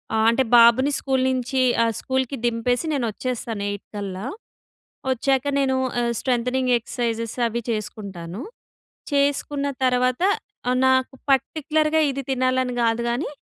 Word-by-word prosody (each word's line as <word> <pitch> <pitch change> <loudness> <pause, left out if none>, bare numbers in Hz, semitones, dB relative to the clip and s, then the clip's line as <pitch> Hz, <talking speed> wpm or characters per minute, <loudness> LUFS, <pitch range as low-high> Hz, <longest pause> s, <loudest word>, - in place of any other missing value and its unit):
ఆహ్, 220 0 +3
అంటే 265 +3 +2
బాబుని 235 +4 +6
స్కూల్ 265 -1 0
నుంచి 255 +1 -1 0.2
ఆహ్, 230 -1 +1
స్కూల్‍కి 260 +1 -1
దింపేసి 240 +4 0
నేను 270 -4 0
వచ్చేస్తాను, 230 -3 -4
8 205 - -7
కల్లా. 200 0 -5 0.9
వచ్చాక 265 +2 +1
నేను 265 -1 +1 0.2
ఆహ్, 235 0 0
స్ట్రెంథెనింగ్ 250 0 +1
ఎక్ససైజెస్ 230 -1 -3
అవి 235 +1 -3
చేసుకుంటాను. 200 -3 -5 0.7
చేసుకున్న 285 0 +1 0.2
తర్వాత, 250 +4 +2 0.5
ఆహ్, 250 0 +2
నాకు 260 0 +2 0.2
పర్టిక్యులర్‌గా 310 +3 +2
ఇది 275 +1 -4
తినాలని 255 -1 +1
కాదు 230 0 +1
కానీ, 245 +5 -2
250 Hz, 125 wpm, -23 LUFS, 230-265 Hz, 0.9 s, బాబుని